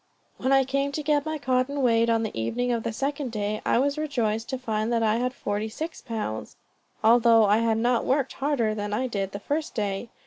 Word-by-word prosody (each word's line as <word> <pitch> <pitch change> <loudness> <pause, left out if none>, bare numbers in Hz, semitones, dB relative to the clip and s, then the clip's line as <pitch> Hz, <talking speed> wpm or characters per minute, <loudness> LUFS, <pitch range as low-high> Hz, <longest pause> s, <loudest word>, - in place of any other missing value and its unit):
When 260 - -1
I 270 0 +5
came 275 +2 -1
to 305 - -3
get 295 0 +1
my 315 0 -2
cotton 260 +1 0
weighed, 230 -1 +3
on 225 -1 +2
the 220 - -4
evening 240 - -1
of 235 -1 0
the 230 - -3
second 275 +2 -3
day, 210 -1 -2
I - - +2
was 285 +4 +1
rejoiced 230 -7 -1
to 260 - -2
find 220 -2 -2
that 230 -1 +1
I 220 0 +2
had 250 +1 0
forty 210 -3 -3
six 320 +9 -6
pounds, 215 - -5 0.5
although 230 0 +6
I 205 +1 +4
had 230 -1 +1
not 240 +1 +2
worked 270 0 0
harder 270 -6 0
than 205 -1 -4
I 250 +5 0
did 200 -6 -3
the 200 - -6
first 295 +9 -3
day. 205 +1 -2
235 Hz, 220 wpm, -26 LUFS, 215-270 Hz, 0.5 s, although